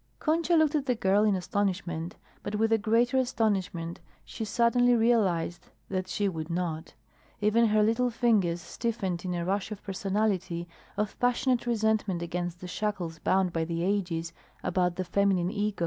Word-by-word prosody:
Concha 330 +2 +1
looked 315 -2 +4
at 290 -2 0
the 250 - +2
girl 200 -1 +3
in 210 -2 +3
astonishment, 180 -3 -2 0.3
but 205 - -4
with 225 +1 +1
a 225 - +4
greater 235 +4 +2
astonishment 190 -9 -1 0.3
she - - -6
suddenly 240 +3 +3
realized 205 -8 +1 0.2
that 185 -1 -2
she 200 +3 0
would 160 -3 -4
not. 165 -2 -3 0.4
Even 215 +2 +3
her 215 0 +3
little 230 +3 +2
fingers 210 -8 +2
stiffened 195 -5 -3
in 180 -1 -2
a 170 -1 -2
rush 195 +3 -1
of 210 - -7
personality, 190 -3 -1 0.3
of 210 0 -2
passionate 245 0 +1
resentment 220 -6 +1
against 175 0 -4
the 180 - -6
shackles 180 -5 -3
bound 185 0 +1
by 165 - 0
the 165 +1 -2
ages 175 -4 -1 0.3
about 180 -2 +1
the 185 - -3
feminine 185 -1 +1
ego. 210 -1 -1
200 Hz, 165 wpm, -28 LUFS, 175-225 Hz, 0.4 s, looked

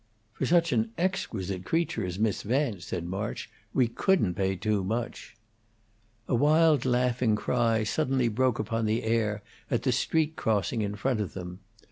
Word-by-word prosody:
"For 135 - -2
such 170 -1 +3
an 115 -2 0
exquisite 105 - -2
creature 160 - 0
as 90 -1 -4
Miss 105 0 0
Vance," 115 -5 -1
said 85 -1 -4
March, 95 +4 -4 0.2
"we 125 -3 +3
couldn't 115 - +1
pay 95 +1 0
too 105 0 0
much." 115 +5 -4 0.9
A - - -1
wild 150 +2 +4
laughing 125 -2 +2
cry 115 0 +1
suddenly 125 +5 +1
broke 120 +2 +1
upon 115 +1 -1
the 110 +2 0
air 110 -2 0 0.3
at - - 0
the - - +2
street 160 -1 +1
crossing 110 +1 0
in 105 0 -2
front 120 +1 0
of 100 - -5
them. 90 -1 -7
115 Hz, 160 wpm, -28 LUFS, 105-130 Hz, 0.9 s, wild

